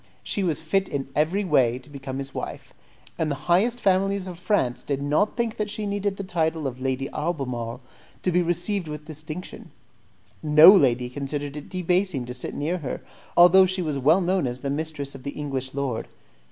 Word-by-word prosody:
She 200 - -1
was 160 -4 -1
fit 190 +4 0
in 135 -2 -3
every 165 +7 +1
way 130 -8 +3
to 130 - -14
become 135 -2 -7
his 135 0 -6
wife, - - -6 0.5
and 160 - +1
the 145 +1 -5
highest 215 +8 +3
families 195 -1 +2
of 180 -2 -8
France 175 - 0
did 140 -2 -2
not 150 - +1
think 235 -2 -1
that 210 -1 -2
she 210 0 -3
needed 200 -1 -1
the 200 - -4
title 160 -4 -1
of 130 -1 -4
Lady 135 +1 -1
Albemarle 130 -7 -3 0.4
to 185 - +1
be 180 +1 +3
received 175 +2 -1
with 150 0 -7
distinction; 155 +3 -7 0.7
no 155 +3 +9
lady 125 - +4
considered 140 +2 -4
it 150 - -8
debasing 180 -6 0
to 125 - -6
sit 125 - -6
near 165 +5 -1
her, 140 -6 -5 0.4
although 180 +2 +8
she 185 0 -1
was 150 -4 -2
well 155 +8 +4
known 180 -4 +1
as 125 +1 -5
the 140 - -2
mistress 145 -2 -3
of 135 - -10
the 140 +2 -6
English 135 -2 -4
lord. 135 -5 -2
155 Hz, 195 wpm, -25 LUFS, 135-185 Hz, 0.7 s, no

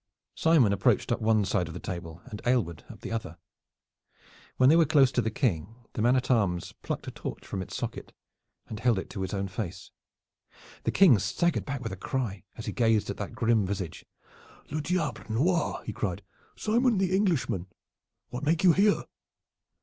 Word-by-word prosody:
Simon 150 -11 +4
approached 100 - +2
up - - 0
one 110 -2 +3
side 90 -2 0
of 80 - -8
the - - -5
table 85 -2 -6
and 105 - -8
Aylward 105 -11 +1
up - - -11
the - - -6
other. 110 -8 -4 1.2
When 130 - +5
they 155 - +7
were 165 - +6
close 140 -4 +5
to 125 - +1
the 110 - -1
King, 110 - -1 0.2
the - - -2
man 120 +3 +4
at 130 0 0
arms 95 -6 +1
plucked - - -4
a - - -5
torch - - -7
from 95 - -4
its 95 - -6
socket - - -5 0.5
and 105 - -7
held 115 -2 +3
it 95 - -5
to 100 - -5
his 95 - -3
own 100 -1 -2
face. 90 -2 -6 0.9
The - - +2
King 170 - +6
staggered 170 - 0
back 140 -2 -4
with 115 -4 -4
a - - -4
cry, 105 -3 -3
as 115 - -6
he - - -2
gazed 115 -4 +2
at - - -7
that 105 - -5
grim 115 -2 +2
visage. 95 -4 -4 0.7
"Le 155 +1 -1
diable 150 -6 -1
noir!" 165 +11 +1
he - - -4
cried. - - -3 0.3
"Simon, 235 +1 +2
the 185 -1 +2
Englishman! 165 - +1 0.6
What 125 - -5
make 160 +4 +1
you 180 -3 +7
here?" 205 +3 +3
115 Hz, 190 wpm, -28 LUFS, 95-150 Hz, 1.2 s, they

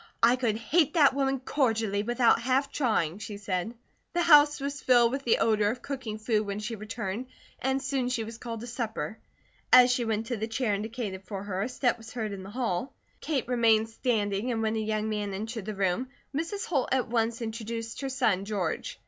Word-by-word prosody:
"I 240 +2 +7
could 240 -4 0
hate 310 +8 +2
that 290 -5 +6
woman 270 -1 0
cordially 225 -7 0
without 240 +1 +3
half 265 +3 +1
trying," 205 - 0
she 210 -1 -6
said. 200 +2 -3 0.4
The 350 0 +2
house 295 -3 +7
was 280 0 -4
filled 240 -2 +5
with 275 +1 -4
the 235 - +4
odour 215 -2 +2
of 245 +3 -4
cooking 260 -6 -4
food 215 0 +1
when 200 -1 -4
she 210 +2 -4
returned 215 +2 -5 0.3
and 265 +1 0
soon 270 -2 -1
she 245 -3 -1
was 225 +1 -8
called 230 -2 -6
to - - -6
supper. 230 -2 -4 0.5
As 250 0 +8
she 245 - 0
went 220 -1 -1
to 240 -1 -3
the 220 +1 -2
chair 225 -1 0
indicated 205 -2 -4
for 195 0 -5
her, 195 -2 -3
a 215 - -1
step 250 -2 0
was 225 0 -11
heard 220 -4 -3
in 200 -1 -6
the 190 - -9
hall. 230 -1 -2 0.2
Kate 285 -7 -2
remained 225 -3 +3
standing 220 -1 -1
and 225 -1 -1
when 220 0 0
a - - 0
young 215 0 -1
man 210 -2 -2
entered 220 +1 -5
the 215 -1 -4
room 195 +6 0 0.3
Mrs. 365 +8 -2
Holt 285 - 0
at 260 -2 +1
once 230 0 0
introduced 230 0 -5
her 270 - -2
son, 230 -8 +1
George. 200 -2 -3
230 Hz, 210 wpm, -28 LUFS, 215-255 Hz, 0.5 s, As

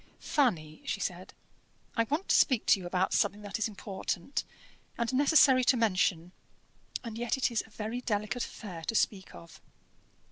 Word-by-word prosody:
"Fanny," 170 - 0
she - - -3
said, - - -5 0.6
"I 230 - +2
want 300 +10 -2
to - - +5
speak 255 -6 +3
to 200 - +5
you 180 - -6
about 185 +1 0
something 205 0 +1
that 205 +2 -4
is 220 - +1
important 195 +2 -4 0.5
and 235 +2 -1
necessary 275 -2 +5
to 260 - +4
mention, 185 -6 +1 0.7
and 230 -2 -6
yet 240 +2 0
it 255 - +1
is 230 - +1
a - - -20
very 220 +3 -5
delicate 215 +1 -1
affair 180 -7 -8
to 225 - -2
speak 195 -3 0
of." 85 0 -13
220 Hz, 170 wpm, -30 LUFS, 190-250 Hz, 0.7 s, to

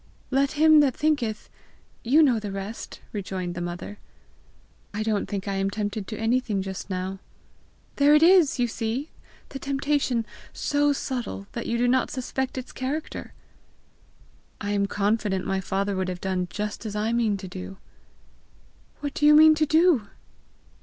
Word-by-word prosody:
"' - - -34
Let 275 +1 +2
him 310 0 +6
that 275 -4 +3
thinketh 255 -8 0 0.3
' - - -34
you 315 +3 +7
know 250 -6 +3
the 210 -2 -5
rest!" 195 +3 -7
rejoined 185 -3 -4
the 175 - -5
mother. 175 +4 -6 1.0
"I 215 - -1
don't 215 -2 0
think 200 -1 -4
I 200 - -1
am 195 0 0
tempted 205 -1 -3
to 215 - -5
anything 225 -3 0
just 190 +1 -6
now." 190 +1 -3 0.8
"There 290 +1 +6
it 300 - +5
is, 345 -5 +6
you 245 -1 +2
see! 235 +6 -3 0.4
the 270 - -7
temptation 275 -3 0 0.3
so 290 0 +1
subtle 250 -7 -4
that 235 - -5
you 235 - 0
do 245 +1 +2
not 255 +1 +2
suspect 260 0 -3
its 255 - -6
character!" 285 +5 -5 1.3
"I 205 -1 -3
am 200 -1 +1
confident 205 -1 0
my 190 0 -1
father 195 +2 -1
would 185 0 -1
have 180 -1 -4
done 185 -1 -1
just 210 +1 -4
as 215 -2 -5
I 215 +2 0
mean 225 -4 +1
to 190 -1 -8
do!" 95 - -8 1.2
"What 285 -1 -3
do 295 - +2
you 300 - +8
mean 310 +1 +8
to 310 0 +1
do?" 315 - +4
225 Hz, 170 wpm, -25 LUFS, 195-275 Hz, 1.3 s, you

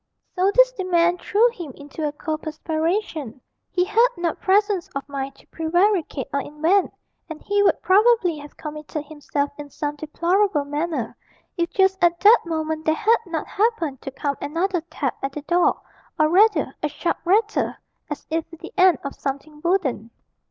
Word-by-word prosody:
So 370 +1 +3
this - - +6
demand 355 -5 +1
threw 460 +4 +3
him 345 - -8
into 290 +2 -5
a - - -2
cold 310 +1 -4
perspiration; 315 - -2 0.3
he 360 -1 +1
had 450 +5 +4
not 345 -2 -2
presence 400 -2 +2
of 275 - -4
mind 275 -1 -5
to - - -21
prevaricate 335 -3 0
or 280 - +1
invent, 320 +8 +1 0.4
and 320 -1 -7
he 405 0 +1
would 405 - +3
probably 390 -5 +4
have 290 0 -12
committed 305 0 -6
himself 290 -1 -3
in 290 -1 -7
some 295 +1 -4
deplorable 335 +2 +1
manner, 290 -4 -3 0.4
if 340 -2 0
just 380 -1 +2
at 345 0 +4
that 435 +4 +8
moment 315 -1 -2
there 315 - +3
had 445 +4 +3
not 330 -3 -3
happened 385 - -1
to - - -5
come 280 +1 -3
another 340 +5 -1
tap 285 -5 -3
at 270 0 -3
the 300 - -6
door, 350 +3 +2 0.4
or 310 0 +4
rather 420 +6 +4
a 300 - 0
sharp 335 +4 -2
rattle, 420 +4 +1 0.3
as 295 - -6
if 325 0 0
with 330 -2 -14
the - - -9
end 365 -4 +6
of 280 - -4
something 285 +2 -6
wooden. 330 - 0
330 Hz, 175 wpm, -23 LUFS, 295-380 Hz, 0.4 s, that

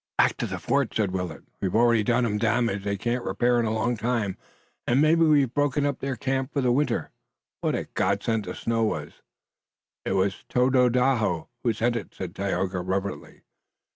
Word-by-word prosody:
"Back - - +4
to - - -2
the - - -4
fort!" 140 -3 0
said 105 -4 +1
Willet. 90 -4 -4 0.2
"We've 95 0 -1
already 115 -1 +4
done 120 +2 +2
'em 105 -2 -1
damage 115 -2 +1
they 100 0 -1
can't 120 +4 -1
repair 120 0 +1
in 115 - +1
a - - 0
long 110 +2 0
time, 115 -4 -1 0.5
and 120 +3 +3
maybe 155 +3 +4
we've 145 -6 +3
broken 145 0 +1
up 140 -2 -1
their 135 -1 -2
camp 135 +3 -2
for 140 - +1
the 125 -2 +2
winter! 145 +4 0 0.5
What - - 0
a - - -2
godsend 105 +2 0
the - - -5
snow 115 0 0
was!" 80 -9 -3 0.8
"It - - -1
was 95 0 0
Tododaho 125 -7 +2
who 120 - +2
sent 120 +2 0
it," 115 - -6
said 90 -2 -6
Tayoga, 95 -1 -1
reverently. 95 +2 -4
115 Hz, 185 wpm, -26 LUFS, 100-125 Hz, 0.8 s, Back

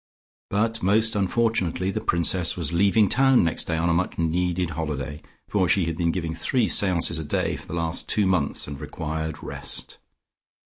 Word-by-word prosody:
But 115 +2 0
most 110 +4 +3
unfortunately 100 -3 0
the - - -3
Princess 85 +1 +1
was 85 -2 -3
leaving 100 +4 +4
town 135 +4 +4
next 80 - 0
day 80 - -1
on 85 +1 0
a 85 - +2
much 90 +3 -1
needed 90 +1 0
holiday, 75 -2 -4 0.3
for 95 -4 +1
she 90 0 +3
had 85 0 -2
been 85 0 0
giving 85 -2 -3
three 115 +8 0
seances 85 -4 +2
a - - -4
day 75 - -1
for - - -11
the - - -5
last 85 0 -3
two 105 -2 +3
months 90 -6 +1
and 70 0 -7
required 80 0 -5
rest. - - -4
85 Hz, 180 wpm, -24 LUFS, 80-100 Hz, 0.3 s, leaving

